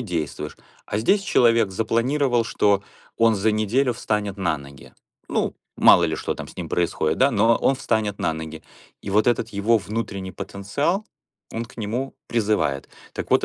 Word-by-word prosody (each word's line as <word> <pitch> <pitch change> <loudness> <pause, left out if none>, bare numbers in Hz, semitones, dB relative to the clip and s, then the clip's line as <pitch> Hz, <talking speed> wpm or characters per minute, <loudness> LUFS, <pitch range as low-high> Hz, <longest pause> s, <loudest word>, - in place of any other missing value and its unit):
действуешь. 85 - -4 0.3
А - - -2
здесь 195 - +3
человек 115 - +3
запланировал, 120 +4 +1
что 105 -3 +2 0.4
он 115 -1 +5
за 105 +2 +2
неделю 115 +5 +1
встанет 105 -3 -2
на 85 -5 +1
ноги. 70 -1 -13 0.3
Ну, - - -1 0.2
мало 85 - +7
ли 80 -2 -1
что - - -2
там - - -8
с - - -14
ним - - -6
происходит, 85 -3 0
да, 135 +2 +5
но 115 +1 +4
он 135 - +2
встанет 110 -6 -1
на 80 - 0
ноги. 80 0 -7 0.4
И 100 - -5
вот 105 +2 +3
этот 115 -2 +1
его 105 +3 +2
внутренний 100 -3 -4
потенциал, 140 - -2 0.5
он 115 +1 -3
к 125 - -18
нему 120 +5 -3
призывает. 105 -12 0 0.2
Так - - -6
вот, - - +4
110 Hz, 170 wpm, -23 LUFS, 95-115 Hz, 0.5 s, мало